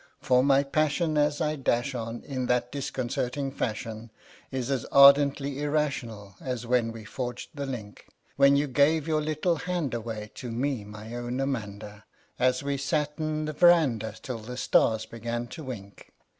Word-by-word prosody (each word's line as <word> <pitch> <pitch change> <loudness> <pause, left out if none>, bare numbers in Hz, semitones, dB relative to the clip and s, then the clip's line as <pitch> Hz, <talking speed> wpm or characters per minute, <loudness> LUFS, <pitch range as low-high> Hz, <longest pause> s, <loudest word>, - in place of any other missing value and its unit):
For 125 0 +3
my 140 0 +4
passion 155 +3 +1
as 150 0 +2
I 155 0 +1
dash 130 -1 0
on 115 -1 -5
in 130 -3 -3
that 125 0 +1
disconcerting 135 0 -2
fashion 115 -2 -4 0.4
Is 130 -1 -3
as 130 -4 0
ardently 140 0 +5
irrational 130 -9 -2
as 125 -5 -4
when 120 -1 +1
we 115 -1 -9
forged 125 +1 -5
the 140 -2 -4
link 110 -6 -7 0.3
When 140 0 +6
you 145 +1 +2
gave 145 +3 +2
your 155 -1 +1
little 155 +3 0
hand 170 -5 -2
away 110 -2 -5
to 125 - -7
me, 125 -1 -1
my 105 +2 -9
own 120 +1 -3
Amanda 105 -6 -4 0.3
An 130 0 +4
we 140 0 -1
sat 150 +2 0
'n 155 0 -1
the 155 - -3
veranda 140 -11 +4
till 125 -3 -5
the 125 +3 -8
stars 110 -3 +2
began 115 +1 -4
to 160 - -8
wink. 100 -6 -9
130 Hz, 165 wpm, -27 LUFS, 115-145 Hz, 0.4 s, When